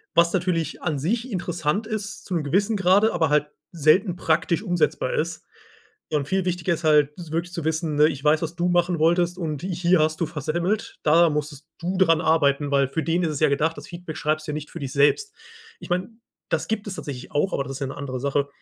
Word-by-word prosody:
Was 170 +1 +4
natürlich 170 -4 -1
an 155 -4 -1
sich 230 - -2
interessant 175 +2 -1
ist, 210 -2 -5
zu 185 - -5
'nem 165 -3 0
gewissen 200 +9 +1
Grade, 195 +4 +4
aber 160 -3 +1
halt 150 0 +3 0.3
selten 175 +4 +3
praktisch 170 +3 0
umsetzbar 355 - 0
ist. 475 - -2 0.7
Und 145 -2 0
viel 190 +1 0
wichtiger 180 -1 0
ist 165 - -5
halt 150 -2 +4
s 165 -3 -9
wirklich 170 +2 -2
zu 170 - -4
wissen, 160 0 -1
ne: 150 +1 +6
„Ich 140 -3 -4
weiß, 150 +2 +3
was 165 +1 -4
du 175 +1 0
machen 175 -1 +2
wolltest 175 +2 +2
und 155 -5 -3
ich 180 -2 -3
hier 175 -1 +4
hast 155 +1 +1
du 170 - +1
versemmelt. 170 +8 -2
Da 165 +2 +5
musstest 150 0 -4
du 180 +3 -3
daran 165 -3 +4
arbeiten“, 145 -3 +2
weil 140 -1 +3
für 160 +4 -2
den 170 +2 +1
ist 165 - 0
es 150 - -3
ja 155 -2 +4
gedacht, 160 +3 0
das - - -8
Feedback 175 -2 -8
schreibst 155 -1 -1
du - - -2
ja - - -4
nicht 150 -1 -6
für 170 - -7
dich 135 -2 -5
selbst. 275 - +3 0.5
Ich - - -10
meine, 180 +3 0 0.4
das - - -1
gibt 215 -1 -2
es 195 - -3
tatsächlich 130 -6 -7
auch, 155 +6 0
aber - - 0
das 135 0 -7
ist 135 - -7
ja - - 0
'ne 135 - -7
andere 130 -3 -4
Sache. 140 +1 0
165 Hz, 235 wpm, -24 LUFS, 150-180 Hz, 0.7 s, ne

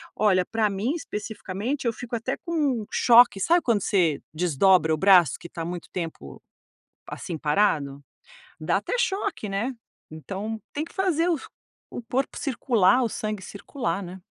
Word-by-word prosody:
olha, 185 -4 +3
para 225 -2 0
mim 205 +8 -1
especificamente, 220 - -5
eu 235 - +1
fico 240 +1 -6
até 235 +4 -3
com 290 -10 0
choque, 235 -4 +6
sabe 340 - +3
quando 225 -5 +1
você 170 -8 +1
desdobra 175 +1 +3
o - - 0
braço 180 -5 +6
que 170 - -9
está 165 -1 -6
muito 175 0 -6
tempo, 160 - -6 0.7
assim, 170 -3 -6
parado? 150 -4 +1 0.6
Dá - - +1
até - - -3
choque, 390 - -1
né. 200 +7 -2 0.4
Então 195 +8 -6
tem 300 +2 -2
que - - -15
fazer 355 -3 +1 0.6
o 245 - -6
corpo 265 +2 -1
circular, 240 -4 +2
o - - 0
sangue 215 -2 -4
circular, 200 -2 -4
né. 180 +1 -9
205 Hz, 150 wpm, -25 LUFS, 180-245 Hz, 0.7 s, choque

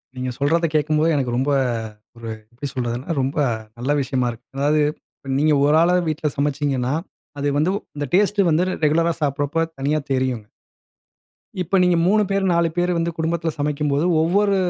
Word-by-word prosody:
நீங்க 130 0 -3
சொல்றதை 165 +4 +2
கேக்கும்போது 155 +2 +2
எனக்கு 125 -4 -1
ரொம்ப 135 +3 +1 0.7
ஒரு 115 -1 -7 0.2
எப்டி 130 +4 -5
சொல்றதுனா, 120 +1 -3
ரொம்ப 135 +4 -2
அ - - 0 0.3
நல்ல 130 +4 -1
விஷயமா 130 -1 0
இருக்கு, 120 +2 -13
அதாவது 150 +2 +2 0.4
இப்ப 135 - -7
நீங்க 155 +1 +3
ஒரு 150 +1 +4
ஆளா 175 +2 +4
வீட்ல 155 0 -1
சமச்சீங்கன்னா, 140 -3 0 0.5
அது 145 - -1
வந்து 155 +5 +2 0.2
அந்த 145 0 -2
டேஸ்ட்டு 200 0 +3
வந்து 160 +3 +3 0.2
ரெகுலரா 165 +3 +2
சாப்புறப்போ 145 +3 0 0.2
தனியா 145 +3 +1
தெரியுங்க. 130 -5 -1 1.1
இப்ப 180 +3 -1
நீங்க 180 -1 +3
3 210 +3 +4
பேர், 195 0 +1
4 170 0 +2
பேரு 175 0 +2
வந்து, 170 0 0
குடும்பத்ல 165 0 -1
சமைக்கும்போது, 145 +1 0 0.2
ஒவ்வொரு 200 +5 +2
150 Hz, 160 wpm, -21 LUFS, 135-170 Hz, 1.1 s, ஒரு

